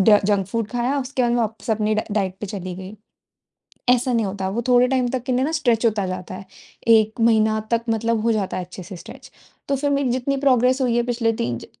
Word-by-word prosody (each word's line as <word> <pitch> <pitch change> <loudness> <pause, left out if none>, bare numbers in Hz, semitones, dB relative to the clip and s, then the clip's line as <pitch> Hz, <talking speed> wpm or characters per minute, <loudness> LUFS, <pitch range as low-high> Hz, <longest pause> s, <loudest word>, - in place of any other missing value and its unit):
ड 210 +1 +6
junk 200 -2 +1
food 230 +2 -2
खाया 245 +3 0
उसके 260 0 -2
बाद 240 - +2
मैं 240 - +1
वापस 225 +1 -3
अपनी 215 0 +1
ड 215 - 0
डाइट 190 -3 -1
पे 210 - -4
चली 185 -3 -6
गई। 190 +3 -9 0.9
ऐसा 250 +1 +3
नहीं 230 -2 +1
होता। 190 -1 -3
वो 225 +5 -2
थोड़े 250 0 +5
टाइम 255 -1 +1
तक 255 -1 -3
के 255 - -3
लिए 255 +1 +2
न 310 - -2
स्ट्रेच 245 -8 +1
होता 210 -4 +1
जाता 185 0 -5
है। 195 - -9 0.4
1 220 0 +4
महीना 220 -1 +3
तक 230 0 +1
मतलब 225 0 0
हो 230 - +2
जाता 205 -4 -1
है 185 - -3
अच्छे-से 185 +1 -10
स्ट्रेच। - - -12 0.4
तो 275 - +1
फिर 285 +2 -1
मेरी 280 -2 +1
जितनी 260 +3 -1
प्रोग्रेस 260 -1 +3
हुई 245 -2 +1
है 240 - +2
पिछले 235 -2 0
3 120 0 -1
ज - - -11
230 Hz, 240 wpm, -22 LUFS, 205-250 Hz, 0.9 s, ड